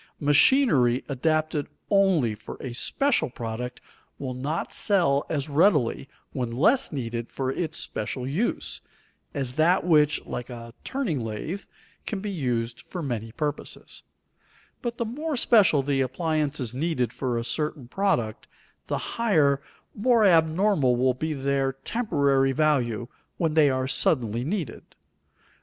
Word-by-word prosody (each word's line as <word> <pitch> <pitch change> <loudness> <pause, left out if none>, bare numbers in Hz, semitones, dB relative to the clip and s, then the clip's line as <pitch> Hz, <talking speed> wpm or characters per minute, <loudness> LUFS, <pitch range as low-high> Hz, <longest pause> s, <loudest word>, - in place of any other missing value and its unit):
Machinery 145 - +4
adapted 155 +2 0 0.2
only 190 - +3
for 105 - -9
a 130 -3 -5
special 275 - +1
product 120 +1 -5 0.4
will 130 -2 -4
not 145 +6 -3
sell 170 -9 +2
as 145 -3 -1
readily 145 - +2 0.2
when 125 -3 -2
less 160 - +3
needed 120 -4 -4
for 130 -1 -2
its 160 +2 -3
special 125 +4 -3
use, 175 - -2 0.5
as 135 -3 -1
that 170 +6 +3
which, 150 -3 +4
like 120 +1 -5
a 115 -1 -9
turning 205 - -2
lathe, 115 - -5 0.4
can 205 - -2
be 205 +1 -4
used 120 -8 -2
for 175 -3 -6
many 115 -5 -3
purposes; 150 -1 -4 0.8
but 235 -1 -3
the 235 - -1
more 295 +7 -3
special 200 - +4
the 135 -1 +1
appliances 145 -2 -1
needed 130 -4 -1
for 125 -3 -2
a 115 - -3
certain 145 +1 -3
product, 125 - -1 0.4
the - - -1 0.2
higher, 145 -11 +3 0.3
more 230 0 +3
abnormal 165 -5 +3
will 130 +1 +2
be 155 +5 -3
their 135 -1 0
temporary 140 - +1
value 125 -6 +1 0.3
when 165 -3 0
they 155 -2 +5
are 130 0 0
suddenly 120 -4 +1
needed. 160 - -3
140 Hz, 135 wpm, -26 LUFS, 125-170 Hz, 0.8 s, they